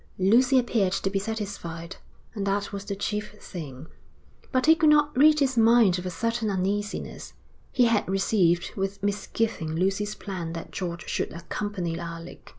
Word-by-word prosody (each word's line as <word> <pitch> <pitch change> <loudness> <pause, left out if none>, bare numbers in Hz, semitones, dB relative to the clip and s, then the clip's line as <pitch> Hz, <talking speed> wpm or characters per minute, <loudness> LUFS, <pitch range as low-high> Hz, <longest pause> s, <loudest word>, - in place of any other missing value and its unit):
Lucy 245 +8 +4
appeared 225 -6 +2
to 195 0 -1
be 195 - 0
satisfied, 195 -5 -5 0.4
and 200 -3 -3
that 200 +1 -1
was 200 0 -5
the 200 -1 -3
chief 210 +1 -3
thing. 155 -9 -8 0.7
But 255 -1 +2
he 320 - +8
could 320 -1 +3
not 295 0 +4
rid 300 +3 +6
his 265 -3 +1
mind 225 -5 +5
of 180 - -5
a - - -1
certain 230 +5 -1
uneasiness. 200 +2 -3 0.4
He 250 - +3
had 230 -5 +2
received 190 -3 +2
with 195 0 -3
misgiving 205 -4 -1
Lucy's 195 +4 0
plan 175 -5 -5
that 165 - -7
George 175 -2 -5
should - - -2
accompany 175 0 -4
Alec. 165 0 -8
200 Hz, 160 wpm, -26 LUFS, 180-225 Hz, 0.7 s, he